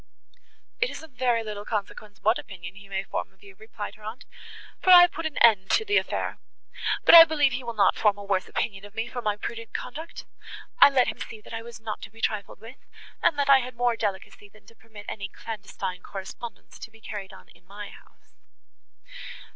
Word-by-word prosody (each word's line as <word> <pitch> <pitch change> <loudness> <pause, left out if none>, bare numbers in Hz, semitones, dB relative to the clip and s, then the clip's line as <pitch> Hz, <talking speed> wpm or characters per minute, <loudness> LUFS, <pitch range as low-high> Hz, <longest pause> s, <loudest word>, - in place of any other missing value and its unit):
"It 470 +1 +2
is - - -8
of 320 - -13
very 245 -2 +1
little 210 -2 -6
consequence 210 -1 -5
what 220 +3 +3
opinion 175 -3 -9
he 195 0 -15
may 190 0 -2
form - - -4
of 190 +1 -26
you," 200 -1 -13
replied 220 -1 -7
her 215 - -18
aunt, 220 +5 -8 0.6
"for - - 0
I 360 -1 +11
have 355 -1 +5
put 330 -1 -3
an 305 - -8
end 205 -5 +5
to 440 - +2
the 410 -1 +3
affair; - - -2 0.7
but - - +7
I 335 -1 +14
believe 300 -4 +2
he 250 +1 -4
will 235 -1 -5
not 200 -2 +4
form 205 -2 +2
a 205 - -8
worse 195 -2 -1
opinion 195 -3 -3
of 205 0 -13
me 225 +1 -2
for 245 +1 -5
my 210 -2 -1
prudent 230 +1 -7
conduct. 310 +7 -7 0.5
I - - +10
let 265 -3 +3
him - - -6
see, 225 - -7
that - - -13
I 225 - -4
was 230 -1 -10
not 220 -1 -6
to - - -8
be 225 +2 -18
trifled 210 -3 -2
with, 225 +5 -13 0.4
and 295 - +3
that 285 -1 +1
I 275 -1 +7
had 250 -1 -6
more 240 0 +1
delicacy, 205 -1 -4
than 215 +1 -21
to 230 - -18
permit 220 -2 -14
any 195 -2 -5
clandestine 195 -4 -6
correspondence 195 +6 -9
to - - -8
be 225 0 -19
carried 205 -3 -7
on 90 - -15
in 180 - -22
my 205 +1 -8
house." - - -19
220 Hz, 220 wpm, -26 LUFS, 200-245 Hz, 0.7 s, I